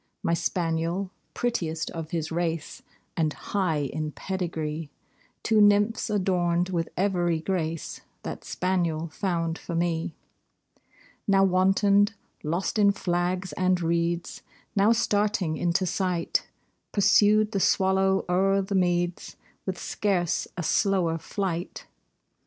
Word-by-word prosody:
My 170 - +1
spaniel, 170 +2 -1 0.2
prettiest 165 -10 -1
of 165 -2 -6
his 160 -2 -3
race, 165 -2 -2 0.3
And 155 -2 +1
high 180 -7 -1
in 155 +2 -3
pedigree 160 -3 -3 0.5
(Two 220 -2 +4
nymphs 205 +2 +3
adorned 180 -3 +1
with 170 -3 -1
every 175 -4 +1
grace 165 -2 -3 0.2
That - - -6
spaniel 170 -3 -1
found 165 -2 -2
for 170 - -5
me) 165 0 -1 1.1
Now 195 -1 +5
wantoned, 195 +3 +3 0.3
lost 170 +7 -1
in 200 -1 +6
flags 180 -1 -1
and 185 0 +2
reeds, 170 0 -1 0.3
Now 200 +2 +4
starting 205 -6 +1
into 175 +4 +1
sight, 180 -1 -1 0.4
Pursued 210 +1 +4
the 200 - 0
swallow 190 0 +2
o'er 195 +2 +2
the 195 - -4
meads 175 -2 0 0.3
With 185 -1 -2
scarce 185 -5 -1
a 175 - -2
slower 175 -3 +1
flight. 180 0 -4
180 Hz, 115 wpm, -26 LUFS, 165-195 Hz, 1.1 s, in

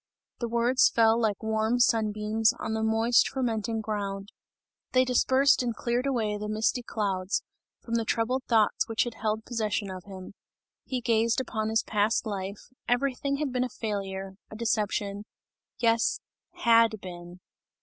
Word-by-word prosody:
The 235 - -2
words 235 +2 +3
fell 225 0 +3
like 215 -2 0
warm 220 +2 +1
sun 225 -3 +3
beams 215 +1 +1
on 220 - -4
the 220 - -1
moist, 225 +2 +3
fermenting 225 -4 -2
ground; 200 -2 -4 0.6
they 255 0 +5
dispersed 260 +2 +3
and 240 -2 -2
cleared 245 +4 -1
away 220 -6 -1
the 210 0 -4
misty 220 +4 0
clouds, 195 -4 -2 0.4
from 230 - -6
the 230 -1 +2
troubled 240 +4 -1
thoughts 220 -3 +2
which 225 - +2
had 240 - -5
held 220 0 -2
possession 215 -4 -2
of 185 -1 -8
him; 190 -1 -10 0.5
he 255 -2 -3
gazed 230 0 +2
upon 220 -4 -2
his 225 +1 +2
past 210 +2 +1
life; 200 -1 -4 0.3
everything 275 +2 0
had 290 -2 -2
been 250 0 +1
a 255 - -3
failure, 195 -4 -4 0.2
a - - -10
deception 210 -2 -1 0.5
yes, 230 -1 +2 0.4
had 230 -2 +5
been. 175 -1 -10
220 Hz, 155 wpm, -28 LUFS, 210-235 Hz, 0.6 s, they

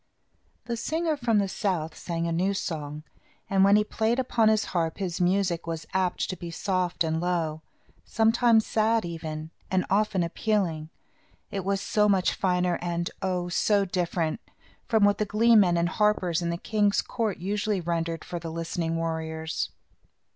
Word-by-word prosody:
] - - -42
The 235 - -2
singer 320 +5 -1
from 240 -5 +1
the 200 -1 +2
south 180 -5 -2
sang 170 -1 -3
a 170 - -1
new 185 +4 +1
song, 150 -5 -4 0.5
and 195 -1 +4
when 200 +1 +6
he 210 - +4
played 220 +2 0
upon 235 -4 +2
his 215 0 +2
harp 165 -3 0
his 180 -3 -3
music 180 -2 +1
was 165 -1 -4
apt 185 -1 0
to - - -4
be 175 -1 -7
soft 180 0 -1
and 160 0 -1
low; 165 -3 -1 0.4
sometimes 225 0 +3
sad, 220 -1 +1
even, 160 -2 -6 0.2
and 185 -1 +1
often 200 -2 +2
appealing. 170 -3 -1 0.6
It 195 -2 -3
was 195 +1 0
so 210 -1 +2
much 190 -2 +3
finer, 180 -2 0
and 170 0 -2
oh! 180 -2 -1
so 200 +3 +2
different, 175 -1 -1 0.5
from 220 -3 +3
what 205 0 +2
the - - +3
glee 225 +3 +4
men 180 -5 +5
and 170 0 +2
harpers 185 -4 +1
in 170 - -1
the 170 - -1
king's 205 +1 +1
court 220 -5 -2
usually 205 +2 -1
rendered 165 -1 -2
for 175 - -5
the 165 0 -6
listening 165 0 -2
warriors. 160 -1 -3
180 Hz, 170 wpm, -27 LUFS, 165-210 Hz, 0.6 s, when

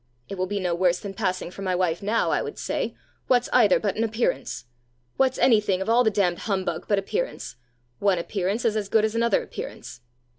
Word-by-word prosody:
'It 195 - -4
will 185 0 -2
be 205 +1 -2
no 180 -2 -1
worse 175 0 +2
than 200 -1 -7
passing 185 -3 -2
for 195 - -10
my 185 -2 0
wife 175 -2 0
now,' 215 +3 +1
I - - +1
would - - -6
say. - - -3 0.3
'What's 245 -1 +2
either 220 -7 +5
but 205 -3 -1
an 225 - +1
appearance? 220 - -1 0.5
What's 265 -1 +2
any 225 -5 +5
thing 195 -3 0
of 190 - -3
all 240 +2 +5
the 220 - +4
damned 195 -4 +1
humbug 185 -4 -2
but 205 - +3
appearance? 460 - -3 0.4
One 200 -2 +2
appearance 195 +6 -2
is 220 -2 +2
as 205 -2 -2
good 220 0 +3
as 220 - -2
another 230 0 +2
appearance! - - -8
200 Hz, 215 wpm, -25 LUFS, 185-225 Hz, 0.5 s, either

